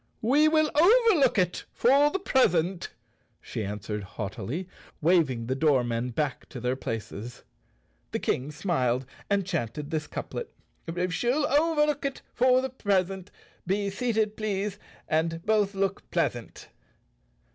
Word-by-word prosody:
"We 285 +7 +4
will 310 -1 +3
overlook 360 - +5
it 180 -2 0
for 280 +4 +4
the 340 - -1
present," 185 - +1 0.5
she 110 - -5
answered 105 +1 -4
haughtily, 105 - -5 0.3
waving 150 -8 +2
the 130 - -1
doormen 125 -4 +1
back 135 +2 -3
to 125 - -7
their 125 +2 -1
places. 115 -1 -6 0.7
The - - -1
King 135 +4 -1
smiled 130 -6 0 0.2
and 200 -2 +1
chanted 150 - -3
this 155 -1 -2
couplet: 480 - -6 0.3
" 180 +2 -2
She'll 250 +9 +1
overlook 300 0 +2
it 275 -1 -3
for 255 +1 +4
the 265 - -1
present; 195 -5 -1 0.4
Be 200 +1 0
seated, 220 -1 0
please, 205 -1 -2 0.3
and 165 +1 0
both 210 -2 +2
look 195 0 -2
pleasant! - - -2
185 Hz, 130 wpm, -27 LUFS, -, 0.7 s, overlook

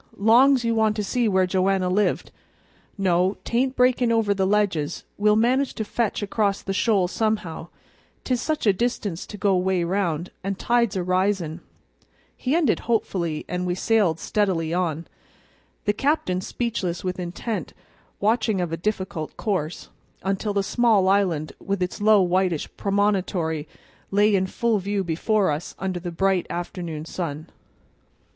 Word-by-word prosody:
Long's 240 +5 +5
you 230 - +2
want 220 -1 +2
to 210 - -2
see 235 +4 0
where 190 -2 +3
Joanna 190 0 +1
lived 200 +3 0 0.7
No, 185 0 +2
'tain't 255 +3 0
breakin' 250 -1 +3
over 225 -3 +2
the 190 -1 0
ledges; 195 -7 0
we'll 210 +1 +3
manage 255 +5 +2
to 220 - -2
fetch 220 -1 -1
across 200 -1 0
the 195 - -2
shoals 195 -3 +2
somehow, 210 -7 -2 0.6
'tis 250 -2 0
such 310 -4 -1
a 205 - +5
distance 205 -5 -2
to 210 - -8
go 195 0 +2
'way 180 -1 +1
round, 175 -2 -1
and 195 0 -2
tide's 235 -3 +1
a 185 - -1
risin'," 185 -2 0 0.7
he 265 +5 -1
ended 315 -9 +2
hopefully, 175 -8 -1
and 180 +1 -2
we 175 - 0
sailed 190 -5 +2
steadily 175 -6 0
on, 170 -2 -1 0.8
the 205 - +2
captain 210 -8 0
speechless 190 -6 -3
with 185 0 -3
intent 180 +5 -4 0.4
watching 220 -1 +1
of 175 -2 -2
a 165 - -2
difficult 185 -4 -3
course, 180 -6 -2 0.3
until 195 +2 -1
the 200 - +2
small 220 -3 +3
island 180 -6 +1
with 200 -1 -2
its 180 - -4
low 210 -2 +5
whitish 180 -3 +1
promontory 190 -6 0 0.4
lay 205 +2 +3
in 190 -1 +2
full 225 +2 0
view 200 +1 -1
before 190 +3 +1
us 150 +3 -4
under 190 -2 -3
the 175 0 -5
bright 190 +1 +1
afternoon 170 -3 -5
sun. 160 -3 -5
195 Hz, 150 wpm, -24 LUFS, 180-215 Hz, 0.8 s, Long's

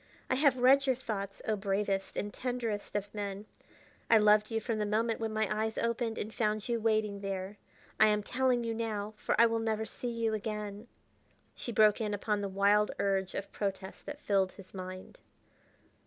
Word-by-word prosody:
I - - +4
have 270 -1 +4
read 270 +2 +5
your 260 - +3
thoughts, 200 -5 -5
oh 215 - +2
bravest 195 -1 -1
and 205 - -3
tenderest 235 -6 -3
of 205 0 -2
men; 200 -1 -4 0.6
I 225 - +8
loved 210 0 +5
you 225 -1 0
from 220 0 -2
the 210 - +1
moment 225 +2 +1
when 225 -1 -2
my 215 -1 +1
eyes 220 +1 -1
opened 230 -1 -1
and 215 +1 -4
found 215 -1 0
you 235 -1 0
waiting 215 -2 +1
there. 195 0 -4 0.4
I 215 - +8
am 210 -1 +2
telling 250 +1 +1
you 230 0 -1
now, 215 -2 -3
for 215 - -1
I 235 - +9
will 230 0 +1
never 220 -1 -1
see 245 +3 -5
you 230 -1 -1
again." 210 0 -4 0.7
She 240 - -6
broke 215 -1 +4
in 210 -2 0
upon 205 0 -1
the 200 - -2
wild 200 +2 +3
urge 195 -1 0
of 200 - -4
protest 195 -1 -4
that 295 0 -6
filled 195 -2 +2
his 195 -2 -14
mind. 185 -1 -8
215 Hz, 190 wpm, -31 LUFS, 200-230 Hz, 0.7 s, I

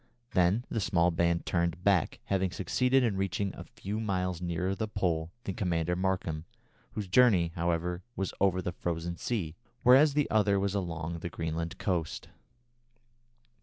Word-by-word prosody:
Then 95 +6 +2
the 115 - -2
small 90 -3 +2
band 85 0 +1
turned 85 0 -1
back, 95 -4 +2
having 95 -1 0
succeeded 125 +9 +2
in 110 -5 +1
reaching 95 0 -1
a - - -8
few 105 +3 -5
miles 90 -5 -1
nearer 90 +2 -1
the 110 +3 -2
Pole 85 -6 -1
than 95 - -3
Commander 90 -2 0
Markham, 90 -4 -1 0.5
whose 105 -3 -4
journey, 95 -5 +4
however, 85 +1 -1
was 95 -1 -2
over 95 -2 +2
the 90 - -2
frozen 85 0 -3
sea, 90 -10 -2 0.3
whereas 135 +4 +6
the 145 -1 +2
other 105 -2 +3
was 100 0 0
along 85 -4 -3
the 85 - -5
Greenland 80 0 -3
coast. 85 -6 -2
90 Hz, 155 wpm, -30 LUFS, 85-100 Hz, 0.5 s, whereas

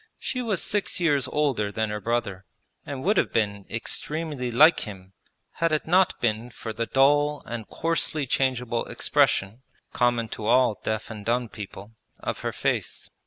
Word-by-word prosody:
She 255 - -3
was 215 -7 0
six 205 -2 0
years 145 -6 +2
older 130 -8 0
than 110 0 -1
her 105 0 -4
brother 110 -4 -2 0.4
and 135 -2 -5
would 205 +3 +2
have - - +2
been 100 -3 -1
extremely 145 +3 -2
like 155 +8 +6
him 95 -3 -8 0.4
had 165 -1 0
it 155 - 0
not 180 +2 +3
been 115 +1 0
for 115 -2 -7
the 115 +1 -2
dull 145 +4 +3
and 115 -2 -6
coarsely 165 -2 0
changeable 125 -3 0
expression 100 +6 +1 0.3
(common 120 -2 +2
to 105 - -5
all 125 -2 +4
deaf 110 +1 -2
and 105 -2 -7
dumb 120 +1 0
people) 100 0 -9 0.3
of - - -3
her - - -2
face. - - -2
120 Hz, 165 wpm, -26 LUFS, 110-150 Hz, 0.4 s, like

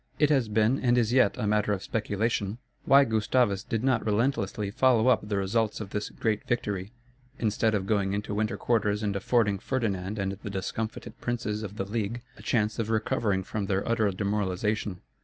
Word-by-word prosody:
It 150 0 +3
has 130 -7 +2
been 110 +5 +2
and 125 -1 +2
is 120 -1 +2
yet 130 -6 +4
a - - -2
matter 105 0 +2
of 95 - -3
speculation, 105 -1 -1 0.3
why 140 +1 +7
Gustavus 110 -3 +1
did 115 +1 -3
not 130 -4 +2
relentlessly 105 -2 0
follow 125 +1 +4
up 105 -4 +2
the 100 - 0
results 105 +3 0
of 100 -3 -7
this 105 0 -3
great 110 -2 -1
victory, 100 -4 -2 0.5
instead 110 -1 +1
of 95 -2 -1
going 100 -2 +1
into 105 0 -3
winter 110 +2 -1
quarters 105 -3 +1
and 100 -2 -1
affording 100 -1 +1
Ferdinand 105 -5 -2
and 95 -1 -1
the 105 - -5
discomfited 110 +4 -5
princes 110 -3 -2
of 105 -1 -7
the 95 - -2
League 115 +3 -3
a - - -14
chance 110 -2 0
of 110 -1 -1
recovering 110 -3 0
from 100 +1 -3
their 95 0 0
utter 110 -3 +2
demoralization. 100 0 -1
105 Hz, 185 wpm, -28 LUFS, 100-115 Hz, 0.5 s, why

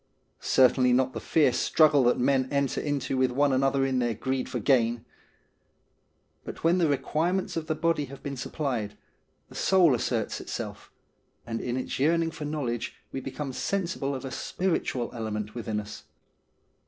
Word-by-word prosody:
Certainly 125 -1 +4
not 130 +1 +2
the - - -4
fierce 130 -6 +2
struggle 150 -4 +4
that 120 - +3
men 130 +1 +2
enter 140 -2 0
into 140 -2 -2
with 130 0 +3
one 140 +2 +2
another 135 +1 +2
in 130 -1 0
their 120 -2 0
greed 130 +3 -2
for - - -3
gain. 120 -3 +2 1.4
But - - -9
when 170 +3 +3
the 170 - +3
require 155 +4 0
ments 190 -1 -2
of 160 -1 -3
the 155 - 0
body 165 -2 +1
have 140 +1 -12
been 140 -1 -4
supplied, 125 -5 -3 0.5
the - - -16
soul 180 -6 +4
asserts 115 -2 -1
itself - - -6 0.6
and 115 -1 -4
in 125 0 -2
its 130 - -4
yearning 165 +3 +2
for 160 -2 -7
knowledge 130 -6 -3 0.2
we 135 - -3
become 135 +1 -5
sensible 170 -6 -2
of 130 - -6
a 130 - -5
spiritual 165 -7 -2
element 110 -2 -4
within 110 -3 -3
us. 105 0 -9
135 Hz, 165 wpm, -27 LUFS, 125-150 Hz, 1.4 s, Certainly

